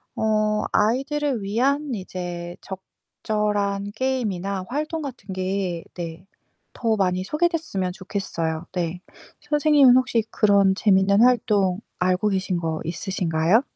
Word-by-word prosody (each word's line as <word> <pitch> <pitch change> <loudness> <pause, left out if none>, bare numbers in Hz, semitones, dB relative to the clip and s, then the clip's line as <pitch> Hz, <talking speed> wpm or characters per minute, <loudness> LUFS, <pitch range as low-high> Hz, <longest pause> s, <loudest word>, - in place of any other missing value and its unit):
어 215 -1 +1
아이들을 270 +3 +1
위한 270 +7 0
이제 175 -3 -5
적절한 200 +1 -3
게임이나 200 -7 -2
활동 305 +4 -2
같은 245 -9 -7
게 185 -2 -2
네 170 0 -7 0.5
더 225 -2 +1
많이 185 -2 +1
소개됐으면 300 - -1
좋겠어요 175 -4 -3
네. 175 -1 -2 0.4
선생님은 295 -4 +5
혹시 240 -3 +2
그런 200 -2 +3
재밌는 200 0 +4
활동 210 -6 +3 0.2
알고 185 +3 +2
계신 190 -2 0
거 160 -2 -2
있으신가요? 175 +3 +1
200 Hz, 255 characters per minute, -23 LUFS, 185-245 Hz, 0.5 s, 선생님은